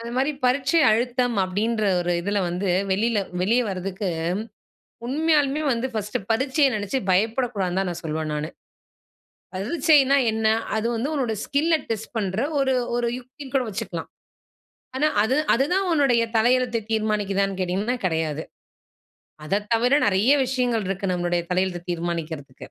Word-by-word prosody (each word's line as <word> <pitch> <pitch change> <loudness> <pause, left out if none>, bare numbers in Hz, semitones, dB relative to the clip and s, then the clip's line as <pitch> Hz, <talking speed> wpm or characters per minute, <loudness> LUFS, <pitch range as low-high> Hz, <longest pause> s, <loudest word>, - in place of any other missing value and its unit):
அந்த 230 0 -6
மாதிரி 270 +3 +2
பரீட்சை 275 +5 +3
அழுத்தம் 245 +1 +1
அப்படின்ற 215 +4 -1 0.2
ஒரு 175 0 0
இதில 205 +3 -1
வந்து 180 +3 -2 0.2
வெளியில 215 +3 +1 0.2
வெளிய 235 +6 +3
வர்றதுக்கு 190 +1 -3 1.0
உண்மையாலுமே 295 +1 +1
வந்து 235 +1 -1
பர்ஸ்ட் 210 0 -2
பரீட்சைய 265 +5 +2
நெனைச்சு 205 +3 -2
பயப்படக்கூடாதுனு 205 -2 0
தான் 195 -1 -1
நான் 170 - -7
சொல்வேன் 155 -1 -3
நானு. 150 +1 -3 1.1
பரிச்சைனா 280 - +3
என்ன? 220 0 0 0.3
அது 220 +1 0
வந்து 250 +6 -2
உன்னோட 255 -6 -1
ஸ்கில்ல 310 +4 +2
டெஸ்ட் 225 -1 -4
பண்ற 195 -1 -1 0.2
ஒரு, 265 -1 +2 0.2
ஒரு 240 -1 0
யுக்தினு 260 +2 -12
கூட 265 - +3
வச்சுக்கலாம். 195 - -5 0.9
ஆனா, 300 +3 +2 0.2
அது 250 +5 +1 0.2
அது 260 - +3
தான் 385 +1 +1
உன்னுடைய 275 -7 +3
தலையெழுத்த 240 0 +2
தீர்மானிக்கிறதானு 200 -3 0
கேட்டீங்கனா, 195 +7 -1
கெடையாது. 160 -3 -1 1.0
அத 200 +7 0
தவிர 240 +3 +2
நெறைய 205 +6 +3
விஷயங்கள் 245 -4 0
இருக்கு 195 0 -1
நம்மளுடைய 175 0 0
தலையெழுத்த 180 -1 -1
தீர்மானிக்கிறதுக்கு. 165 -5 -4
220 Hz, 135 wpm, -24 LUFS, 190-255 Hz, 1.1 s, பரீட்சை